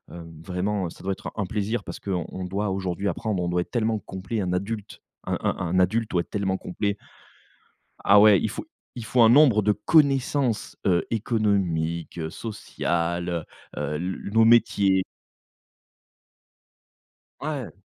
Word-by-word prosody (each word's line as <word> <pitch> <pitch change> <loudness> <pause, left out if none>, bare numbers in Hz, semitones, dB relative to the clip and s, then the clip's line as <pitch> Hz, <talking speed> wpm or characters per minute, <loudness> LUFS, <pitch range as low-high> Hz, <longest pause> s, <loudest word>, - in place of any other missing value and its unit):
heu, 85 - -8 0.2
vraiment, 95 +1 -2
ça - - -14
doit 95 - -1
être - - -8
un 100 - -1
plaisir 105 +4 -2
parce - - -7
qu'on 90 -4 -2
on 95 - -6
doit 100 +3 -2
aujourd'hui 95 0 -2
apprendre, 100 0 -1
on 90 - -1
doit 90 0 +1
être - - -7
tellement 115 -2 +1
complet, 95 +3 -4
un 90 -2 -2
adulte, 105 +3 -4 0.2
un - - -2
un - - 0
un 90 +1 0
adulte 110 +5 +1
doit 85 - +2
être - - -11
tellement 95 -2 -1
complet 100 +3 -3 1.1
Ah 100 +1 +7
ouais 105 -2 +7
il - - 0
faut - - -6 0.3
il 120 -3 -6
faut 125 +2 +2
un 115 - +7
nombre 125 -4 +6
de 105 +1 +3
connaissances, 135 0 +2
heu, 90 -3 +2
économiques, 95 -8 0
sociales, 85 -4 -3 0.5
heu - - -2
heu, 75 +1 -2
le 90 +4 -4
nos 115 0 +5
métiers 100 -5 +4 2.4
Ouais. 145 -6 -4
100 Hz, 160 wpm, -25 LUFS, 90-110 Hz, 2.4 s, Ah